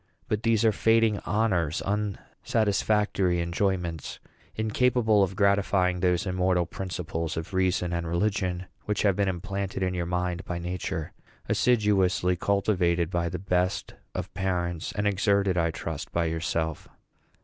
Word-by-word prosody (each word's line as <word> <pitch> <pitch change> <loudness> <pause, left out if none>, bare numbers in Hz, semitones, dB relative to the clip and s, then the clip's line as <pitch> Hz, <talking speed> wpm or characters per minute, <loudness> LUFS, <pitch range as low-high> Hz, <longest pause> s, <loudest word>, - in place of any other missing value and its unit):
But 105 -1 -1
these 115 -1 +2
are 110 - +6
fading 115 0 +3
honors, 95 -8 +1
unsatisfactory 105 -2 0
enjoyments, 85 -2 -1 0.4
incapable 110 -1 +2
of 95 -1 +1
gratifying 100 -2 +2
those 90 +1 +1
immortal 90 -1 +1
principles 85 -3 -4
of 80 +4 -5
reason 95 -1 +1
and 85 -1 -2
religion 90 0 0 0.2
which 105 - -1
have 100 -3 +3
been 100 0 +1
implanted 95 +1 -3
in 90 0 0
your 85 -1 -2
mind 90 0 -1
by 90 - -4
Nature, 90 -1 -4 0.3
assiduously 100 -6 +2
cultivated 90 -3 +1
by 85 -1 0
the - - -4
best 90 0 -1 0.2
of - - -4
parents, 90 -3 -2
and 105 - -2
exerted, 100 -1 +2
I 85 -1 +2
trust, 80 -2 -5
by 85 0 +1
yourself. 80 -1 -2
95 Hz, 135 wpm, -27 LUFS, 85-100 Hz, 0.4 s, are